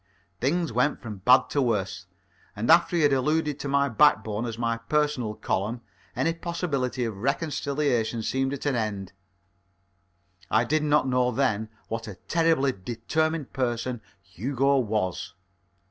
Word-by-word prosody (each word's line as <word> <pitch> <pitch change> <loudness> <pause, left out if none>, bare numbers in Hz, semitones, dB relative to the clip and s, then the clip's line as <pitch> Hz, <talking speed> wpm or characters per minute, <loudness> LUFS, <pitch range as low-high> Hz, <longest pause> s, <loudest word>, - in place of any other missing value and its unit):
Things 160 +3 0
went 125 +5 +1
from 110 -3 -7
bad 125 +7 +4
to 145 - +1
worse, 100 -6 -1 0.5
and 110 +4 +1
after 170 +1 +5
he 165 - +3
had 145 -1 +4
alluded 150 +2 +1
to - - -4
my 140 0 +2
backbone 110 -4 +2
as 115 -1 -5
my 115 -1 0
Personal 125 -2 -1
Column, 110 +6 -2 0.3
any 160 +7 +1
possibility 150 -8 -2
of 110 -3 -4
reconciliation 135 -2 -1
seemed 135 +3 0
at 140 0 -5
an 145 -3 +1
end. 100 -5 -3 1.4
I 110 +2 +3
did 155 +6 +1
not 150 -2 +2
know 125 -1 +2
then 110 -4 0 0.2
what 115 0 -4
a 105 - -7
terribly 160 - +1
determined 130 - -2
person 120 -2 -2 0.2
Hugo 135 +8 0
was. 100 -6 -2
125 Hz, 145 wpm, -26 LUFS, 110-145 Hz, 1.4 s, after